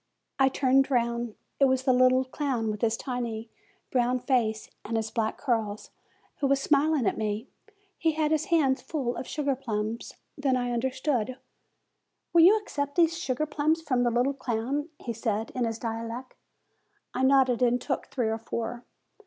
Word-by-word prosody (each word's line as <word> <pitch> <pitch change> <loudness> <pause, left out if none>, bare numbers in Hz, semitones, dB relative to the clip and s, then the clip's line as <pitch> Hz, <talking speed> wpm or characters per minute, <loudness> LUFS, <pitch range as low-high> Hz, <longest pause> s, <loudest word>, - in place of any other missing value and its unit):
I 270 0 +5
turned 270 0 +3
round. 235 -3 0 0.2
It 275 - +6
was 260 -1 +2
the 260 -1 +4
little 255 +1 +4
clown, 255 -5 -1
with 210 - -6
his 230 0 +1
tiny, 235 -3 -4 0.4
"brown 250 0 +2
face 235 -4 0 0.2
and 225 +1 -2
his 220 0 -2
black 220 -2 -1
curls, 220 -6 -2 0.5
who 280 - +1
was 275 0 +3
smiling 290 -1 +2
at - - 0
me. 215 +3 -2 0.5
He 325 -1 +2
had 310 0 0
his 315 -1 +1
hands 305 -8 +2
full 260 -7 -2
of 255 - -5
sugar 285 -3 -1
plums. 225 -3 -4 0.2
Then 275 -4 +1
I 245 -1 -1
understood. 255 0 -1 1.0
"Will 340 - +7
you 385 +6 +8
accept 285 -9 -4
these 335 -1 +4
sugar 305 -4 -1
plums 310 +2 0
from 255 -5 +1
the 245 - +3
little 245 +4 +1
clown?" 260 +4 -2
he 235 - -5
said, 220 -1 -2
in 250 -2 -1
his 225 -1 -2
dialect. 230 +2 -5 0.8
I - - -2
nodded, 260 -2 +4
and 245 0 +3
took 270 +2 -3
three 240 -4 -1
or 225 0 -2
four. 235 +1 -4
255 Hz, 170 wpm, -28 LUFS, 230-280 Hz, 1.0 s, you